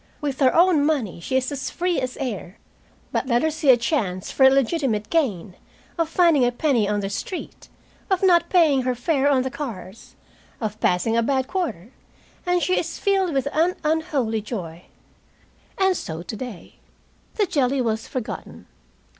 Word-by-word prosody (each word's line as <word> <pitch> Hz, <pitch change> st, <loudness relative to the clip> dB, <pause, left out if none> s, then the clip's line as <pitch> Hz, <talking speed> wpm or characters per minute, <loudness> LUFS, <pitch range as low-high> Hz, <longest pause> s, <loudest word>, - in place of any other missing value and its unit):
With 280 Hz, -3 st, -3 dB
her 260 Hz, -3 st, +5 dB
own 340 Hz, -3 st, +5 dB
money 275 Hz, -, 0 dB
she 260 Hz, +10 st, -1 dB
is 260 Hz, +1 st, -1 dB
as 270 Hz, -2 st, -4 dB
free 350 Hz, -4 st, -1 dB
as 255 Hz, 0 st, -4 dB
air. 220 Hz, -7 st, -5 dB, 0.5 s
But -, -, -1 dB
let 240 Hz, -1 st, +2 dB
her 315 Hz, -, +2 dB
see 305 Hz, -2 st, -1 dB
a 250 Hz, -, +8 dB
chance 210 Hz, -, -2 dB
for 270 Hz, -, +2 dB
illegitimate 265 Hz, -5 st, +2 dB
gain, 210 Hz, -, 0 dB, 0.4 s
of 330 Hz, -2 st, -1 dB
finding 330 Hz, -5 st, +4 dB
a 245 Hz, -, +3 dB
penny 245 Hz, -5 st, +1 dB
on 205 Hz, 0 st, 0 dB
the 195 Hz, -, -3 dB
street, 360 Hz, -, -6 dB, 0.4 s
of 380 Hz, -1 st, +1 dB
not 350 Hz, -3 st, +4 dB
paying 315 Hz, -7 st, +4 dB
her 255 Hz, 0 st, -1 dB
fare 275 Hz, +3 st, +1 dB
on 265 Hz, -3 st, +3 dB
the 260 Hz, -, -3 dB
cars, 220 Hz, -8 st, -8 dB, 0.4 s
of 215 Hz, -2 st, -4 dB
passing 180 Hz, +5 st, +1 dB
a 230 Hz, -, +3 dB
bad 260 Hz, +2 st, 0 dB
quarter, 285 Hz, -, -3 dB, 0.6 s
and 355 Hz, 0 st, +2 dB
she 370 Hz, -, +2 dB
is -, -, -4 dB
filled 385 Hz, -3 st, +1 dB
with 275 Hz, -1 st, 0 dB
an 335 Hz, +4 st, +2 dB
unholy 300 Hz, -8 st, 0 dB
joy. 180 Hz, -6 st, -7 dB, 0.9 s
And 380 Hz, -1 st, +3 dB
so 160 Hz, -, -5 dB
today. 220 Hz, 0 st, -8 dB, 0.6 s
The 420 Hz, -, +2 dB
jelly 275 Hz, -5 st, +1 dB
was 225 Hz, -2 st, -1 dB
forgotten. 255 Hz, -3 st, -6 dB
265 Hz, 170 wpm, -23 LUFS, 225-320 Hz, 0.9 s, a